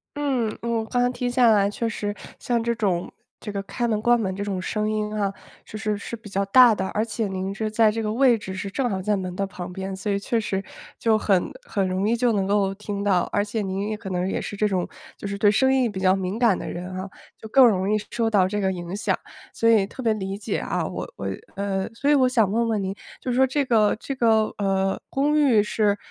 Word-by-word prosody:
嗯， 260 -7 -1
我 230 -1 -1
刚 245 +2 0
才 245 - +3
听 245 -1 -2
下 245 -2 +5
来 200 -2 +4
确 230 +3 -2
实， 205 -2 -3 0.2
像 240 -2 -1
这 235 0 0
种 190 -6 -1 0.3
这 210 - -8
个 200 -1 -4
开 240 +4 -2
门 215 -2 0
关 240 +1 +4
门 190 -4 -2
这 200 - -3
种 195 -3 -3
声 215 +2 -1
音 215 0 -2
啊， 200 -1 0 0.3
就 215 - -9
是 215 -1 -1
是 230 +3 -6
比 215 -1 -13
较 195 0 0
大 240 +1 +7
的， 190 - -2
而 215 - 0
且 225 -1 -2
您 190 +1 -3
是 215 +1 -2
在 220 0 +4
这 225 +1 -2
个 215 - -1
位 245 0 +4
置 190 -3 -7
是 190 +1 -4
正 250 +5 -1
好 190 -3 -2
在 210 +2 +1
门 185 -2 -4
的 195 - -1
旁 180 -1 -7
边， 190 +1 -5
所 200 +2 -3
以 200 - 0
确 230 +3 -1
实， 195 -3 -1 0.4
就 225 -1 +3
很 195 -4 +1 0.2
很 195 - -1
容 190 +3 0
易 - - +3
就 240 -1 +2
能 195 -2 +1
够 200 -1 +1
听 205 0 -5
到。 185 -3 +3
而 205 - +1
且 215 +1 -3
您 195 +1 -2
也 215 - -2
可 210 -2 -8
能 180 0 -1
也 - - -2
是 205 - -6
这 210 - +2
种， 185 -3 0 0.3
就 - - -10
是 200 - -3
对 205 0 +4
声 265 +6 +3
音 255 -3 +2
比 190 -3 -5
较 185 0 +4
敏 190 +2 -2
感 230 -6 +3
的 - - -6
人 180 +2 -6
啊， 185 +1 -5 0.3
就 220 - -10
更 255 +4 +6
容 195 -4 +2
易 - - +3
受 230 -1 0
到 200 -4 +4
这 205 0 -2
个 190 -1 +1
影 175 0 -6
响， 205 - 0 0.4
所 230 - +2
以 215 -4 +5
特 260 - -8
别 225 -2 +3
理 195 -2 -4
解 205 - -3
啊。 - - -2
我 - - -5
我 - - -7 0.3
呃， 195 -1 -2
所 280 +5 +1
以 - - +6
我 260 -2 +4
想 225 -6 +2
问 230 +2 +1
问 215 -3 0
您， 190 +1 -2 0.3
就 255 - -2
说 265 +2 +4
这 285 +3 0
个 225 -5 +3
这 275 - -5
个， 225 -4 +2
呃， 195 -1 0
公 295 +3 +1
寓 250 -8 +4
是， 210 -1 +1
210 Hz, 275 characters per minute, -24 LUFS, 195-230 Hz, 0.4 s, 大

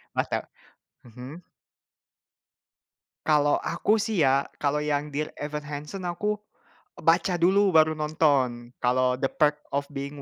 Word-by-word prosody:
mantap, - - -1 0.6
mhm? 125 +8 -10 1.8
Kalau 145 -1 +3
aku 210 +6 0
sih 210 -4 0
ya, 135 0 +3 0.2
kalau 150 +1 +1
yang 150 0 -1
Dear 150 +1 -4
Evan 150 0 -5
Hansen 150 +6 -6
aku 210 +5 -1 0.6
baca 180 -3 +2
dulu 195 +2 +4
baru 155 0 +5
nonton. 140 -6 +1
Kalau 125 +1 +2
The 135 +1 0
Perks 150 0 +1
of 140 0 0
Being 140 0 -6
150 Hz, 125 wpm, -26 LUFS, 140-165 Hz, 1.8 s, baru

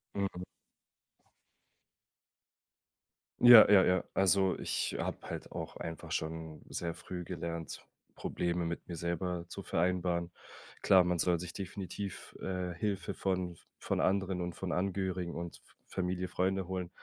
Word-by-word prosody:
Mhm. 95 -2 -2 3.0
Ja 120 -4 +11
ja 95 -2 +8
ja. 90 -1 +3
Also 95 0 +4
ich - - -1
habe - - -2
halt - - -6
auch - - -6
einfach 80 -2 -6
schon 80 0 -3
sehr 85 -1 -3
früh 90 -1 -6
gelernt, 85 -2 -5 0.3
Probleme 85 0 -1
mit 85 0 -4
mir 85 - -5
selber 85 +1 -2
zu 100 - -7
vereinbaren. 90 -1 0 0.5
Klar, 95 -2 +6
man 90 -1 0
soll 85 -1 +3
sich 90 0 -6
definitiv, 95 0 -6
äh, 90 -2 -2
Hilfe 95 0 -2
von 90 -2 -1 0.2
von - - -2
anderen 95 -1 +1
und 90 0 -3
von 95 -2 -4
Angehörigen 95 -1 -1
und 85 0 -5
F - - -25
Familie 90 0 -2
Freunde 95 +1 0
holen, 90 -2 -3
90 Hz, 135 wpm, -33 LUFS, 85-95 Hz, 3.0 s, Ja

